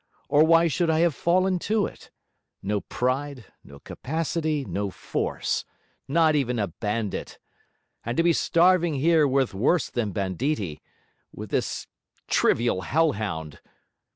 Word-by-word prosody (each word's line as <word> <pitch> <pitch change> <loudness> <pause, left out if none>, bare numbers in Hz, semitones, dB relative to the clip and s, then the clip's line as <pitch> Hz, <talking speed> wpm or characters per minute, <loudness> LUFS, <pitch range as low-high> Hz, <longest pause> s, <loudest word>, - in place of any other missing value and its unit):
Or 145 +3 +5
why 165 +1 +5
should 165 +3 0
I 160 0 +2
have 170 -2 +3
fallen 185 +4 +1
to 215 -1 +2
it? - - -10 0.5
No 100 +1 -1
pride, 130 -1 -2 0.2
no 70 - -13
capacity, 155 - -3
no 100 -3 -3
force. - - -3 0.4
Not 160 +2 +3
even 130 -5 0
a 100 -4 -1
bandit! 105 +3 -4 0.7
and 120 +2 -4
to 165 - +3
be 170 0 +4
starving 170 -1 +3
here 155 +2 +3
with 135 -3 +1
worse 135 - +1
than 110 -4 -2
banditti 95 - -2 0.5
with - - -9
this - - -2 0.4
trivial 115 -5 +2
hell 160 - +2
hound!' 80 -8 -5
140 Hz, 135 wpm, -25 LUFS, 105-165 Hz, 0.7 s, Or